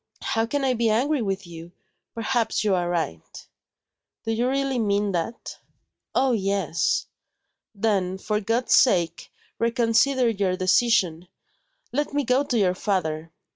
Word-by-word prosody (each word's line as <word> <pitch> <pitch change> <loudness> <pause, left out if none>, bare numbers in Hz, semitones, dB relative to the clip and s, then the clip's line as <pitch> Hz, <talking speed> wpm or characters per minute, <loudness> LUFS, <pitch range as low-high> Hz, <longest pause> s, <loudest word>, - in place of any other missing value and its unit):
"How 225 0 0
can 285 +3 -1
I 260 -1 +2
be 235 -1 +1
angry 265 +6 +1
with 195 -2 -2
you? 170 0 -11 0.4
Perhaps 230 0 0
you 210 -2 +2
are 175 -1 0
right." 160 - -4 0.8
"Do 225 - -1
you 235 +2 0
really 270 -1 0
mean 205 -2 +1
that?" 180 +6 -4 0.6
"Oh, 265 0 +3
yes." 195 - 0 0.7
"Then, 195 -3 0
for 210 +2 -1
God's 230 +4 0
sake, 170 -9 +3 0.3
reconsider 235 +3 +2
your 195 -4 0
decision! 185 -3 +2 0.6
Let 290 +2 -2
me 290 - +1
go 255 +2 +2
to 250 -4 -1
your 190 -4 +3
father." 165 -5 -2
215 Hz, 135 wpm, -24 LUFS, 185-240 Hz, 0.8 s, Oh